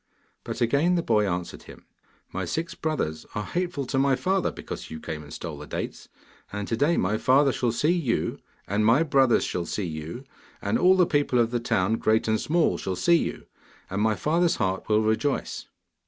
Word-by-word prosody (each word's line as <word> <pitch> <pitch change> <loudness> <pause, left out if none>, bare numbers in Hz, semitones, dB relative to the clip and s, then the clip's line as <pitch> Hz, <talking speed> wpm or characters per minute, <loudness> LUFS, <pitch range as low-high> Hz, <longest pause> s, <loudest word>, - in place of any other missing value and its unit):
But - - -6
again 140 +9 +3
the 170 - 0
boy 105 -6 +2
answered 90 -1 -4
him: - - -14 0.5
'My 95 - -2
six 165 - -3
brothers 150 - -2
are 105 - -1
hateful 175 -1 -2
to 135 +1 -1
my 135 0 +3
father 185 +8 0
because - - -8
you 80 - -7
came 75 0 -6
and 75 -1 -13
stole 80 -2 -6
the 75 - -9
dates, - - -5 0.4
and 105 0 -4
to 115 - 0
day 145 +8 +2
my 105 +4 +1
father 135 +3 +4
shall 120 -2 0
see 150 +8 +1
you, 165 -10 -1 0.3
and 105 +2 +1
my 115 +9 +5
brothers 135 -5 +3
shall 85 -1 -3
see 105 - -2
you, 80 - -6 0.4
and 100 +2 0
all 185 +2 +5
the 180 - +5
people 145 -5 +1
of 115 -1 +3
the 120 - 0
town, 115 -2 +1
great 110 0 +2
and 110 0 +1
small, 170 +1 +1
shall 95 - -3
see 170 - +4
you. - - -3 0.5
And 100 +2 -1
my 110 0 +2
father's 165 - +1
heart 95 +2 -2
will 110 0 +3
rejoice. 110 +6 -1
115 Hz, 200 wpm, -26 LUFS, 100-150 Hz, 0.5 s, my